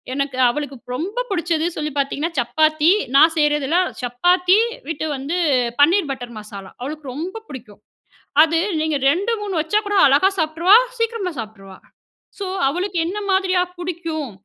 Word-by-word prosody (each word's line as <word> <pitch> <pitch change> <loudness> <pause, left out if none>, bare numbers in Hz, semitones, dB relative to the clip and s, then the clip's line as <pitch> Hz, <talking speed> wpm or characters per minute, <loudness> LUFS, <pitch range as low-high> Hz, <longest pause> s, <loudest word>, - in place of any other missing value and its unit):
எனக்கு 275 -2 -2
அவளுக்கு 280 +1 -4 0.2
ரொம்ப 405 - -3
புடிச்சது 340 -3 0
சொல்லி 300 -1 -3
பார்த்தீங்கன்னா, 285 +4 -2
சப்பாத்தி. 310 +5 +2 0.3
நான் 320 +3 +6
செய்றதெல்லாம் 295 +4 +1
சப்பாத்தி 360 - +3 0.3
வித் 315 -1 -3
வந்து 285 +6 -3 0.4
பன்னீர் 330 +2 +4
பட்டர் 245 -3 -7
மசாலா. 200 -2 -10
அவளுக்கு 285 0 -6
ரொம்ப 375 +9 -6
புடிக்கும். 215 -6 -11 0.6
அது 325 +1 0 0.2
நீங்க 315 -1 0
2 395 +10 0
3 405 -2 -4
வச்சா 330 +7 +1
கூட 410 0 -1
அழகா 285 +8 +4
சாப்பிட்டுருவா, 330 +6 +4 0.2
சீக்கிரமா 460 -5 -1
சாப்பிட்டுருவா. 195 -4 -9 0.6
சோ, 400 - -4 0.2
"அவளுக்கு 355 +6 -2
என்ன 365 +5 -4
மாதிரியா 375 -1 +2 0.2
புடிக்கும்." 335 -5 -5
315 Hz, 135 wpm, -20 LUFS, 275-360 Hz, 0.6 s, நான்